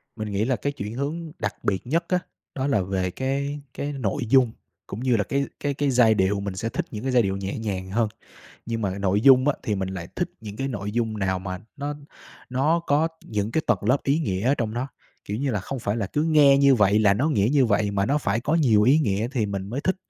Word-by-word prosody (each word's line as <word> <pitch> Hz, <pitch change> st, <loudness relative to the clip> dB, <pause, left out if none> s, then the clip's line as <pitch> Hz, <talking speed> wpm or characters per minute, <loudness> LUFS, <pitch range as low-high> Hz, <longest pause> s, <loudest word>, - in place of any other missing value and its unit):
Mình 110 Hz, -2 st, -5 dB
nghĩ 100 Hz, +3 st, 0 dB
là 130 Hz, -1 st, +1 dB
cái 145 Hz, -, -2 dB
chuyển 105 Hz, -4 st, -6 dB
hướng 155 Hz, +5 st, -4 dB
đặc 105 Hz, -, -2 dB
biệt 100 Hz, +4 st, -1 dB
nhất 165 Hz, +5 st, +1 dB
á, 180 Hz, -1 st, +2 dB, 0.4 s
đó 135 Hz, 0 st, -1 dB
là 105 Hz, -9 st, +2 dB
về 95 Hz, -1 st, -2 dB
cái 140 Hz, +5 st, -2 dB
cái 145 Hz, +1 st, -4 dB
nội 130 Hz, +1 st, -2 dB
dung 125 Hz, -3 st, +5 dB, 0.4 s
cũng 100 Hz, -, -6 dB
như 125 Hz, -2 st, +2 dB
là 105 Hz, -, +1 dB
cái 140 Hz, +6 st, -1 dB
cái 145 Hz, -1 st, -1 dB
cái 145 Hz, 0 st, 0 dB
giai 120 Hz, -3 st, +5 dB
điệu. 100 Hz, 0 st, +1 dB
Mình 100 Hz, -2 st, -4 dB
sẽ 115 Hz, +4 st, -3 dB
thích -, -, -3 dB
những 105 Hz, +2 st, -6 dB
cái 135 Hz, -, -1 dB
giai 125 Hz, -1 st, +5 dB
điệu 95 Hz, 0 st, -1 dB
nhẹ 100 Hz, +2 st, -4 dB
nhàng 95 Hz, -4 st, -4 dB
hơn, 110 Hz, 0 st, +1 dB, 0.6 s
nhưng 115 Hz, -1 st, -2 dB
mà 100 Hz, 0 st, -2 dB
nội 100 Hz, +1 st, +1 dB
dung 130 Hz, +2 st, +6 dB
á 145 Hz, -, +3 dB
thì 105 Hz, -, -1 dB
mình 95 Hz, -1 st, -2 dB
lại 90 Hz, -3 st, -6 dB
thích -, -, -1 dB
những 105 Hz, -1 st, -8 dB
cái 135 Hz, +2 st, -2 dB
nội 105 Hz, -4 st, -4 dB
dung 110 Hz, -2 st, -1 dB
nào 95 Hz, -1 st, 0 dB
mà 95 Hz, -1 st, -5 dB, 0.2 s
nó 145 Hz, +1 st, -3 dB, 0.6 s
nó 150 Hz, +7 st, +2 dB
có 150 Hz, +3 st, +3 dB, 0.2 s
những 105 Hz, +1 st, -2 dB
cái 160 Hz, -, +2 dB
tầng 120 Hz, -6 st, +3 dB
lớp 125 Hz, +7 st, +2 dB
ý 140 Hz, +3 st, +2 dB
nghĩa 95 Hz, -, -2 dB
ở 140 Hz, -, +4 dB
trong 110 Hz, -5 st, -2 dB
nó. 130 Hz, +3 st, -2 dB, 0.4 s
Kiểu 105 Hz, -, -4 dB
như 135 Hz, +2 st, -1 dB
là, 105 Hz, -4 st, -1 dB
không 135 Hz, +7 st, -5 dB
phải 105 Hz, 0 st, -2 dB
là 105 Hz, -4 st, -1 dB
cứ 150 Hz, +9 st, -1 dB
nghe 150 Hz, -4 st, +5 dB
như 140 Hz, -1 st, +6 dB
vậy 105 Hz, -2 st, +4 dB
là 100 Hz, -2 st, +4 dB
nó 140 Hz, +9 st, +1 dB
nghĩa 105 Hz, -7 st, +2 dB
như 135 Hz, -4 st, +4 dB
vậy, 105 Hz, -1 st, +1 dB
mà 100 Hz, 0 st, 0 dB
nó 145 Hz, +3 st, +2 dB
phải 110 Hz, -3 st, -1 dB
có 150 Hz, +5 st, 0 dB
nhiều 115 Hz, -10 st, +4 dB
ý 135 Hz, +7 st, +5 dB
nghĩa 110 Hz, -4 st, 0 dB
thì 115 Hz, -6 st, 0 dB
mình 100 Hz, 0 st, -4 dB
mới 135 Hz, +4 st, -2 dB
thích, 185 Hz, +4 st, 0 dB
115 Hz, 265 wpm, -24 LUFS, 100-140 Hz, 0.6 s, dung